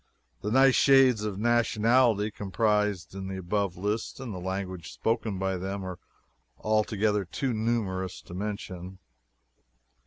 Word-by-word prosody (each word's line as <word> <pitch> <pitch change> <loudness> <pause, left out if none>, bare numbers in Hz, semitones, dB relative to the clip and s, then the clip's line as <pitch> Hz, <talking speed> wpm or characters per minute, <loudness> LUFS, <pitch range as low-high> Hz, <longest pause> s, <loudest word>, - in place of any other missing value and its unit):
The 105 - -2
nice 135 +3 +5
shades 130 -6 +5
of 105 -3 -3
nationality 115 -1 +3
comprised 105 -3 0
in 95 0 -6
the 95 0 -4
above 95 0 -1
list, 105 +7 -2
and 130 -5 -6
the 90 - -5
languages 95 -2 -5
spoken 115 -3 -1
by 95 0 -1
them, 95 +1 -4
are 90 -1 -6 0.6
altogether 105 -1 +1
too 125 +8 -2
numerous 105 -5 -1
to - - -11
mention. 95 -2 -5
105 Hz, 130 wpm, -28 LUFS, 95-115 Hz, 0.6 s, nice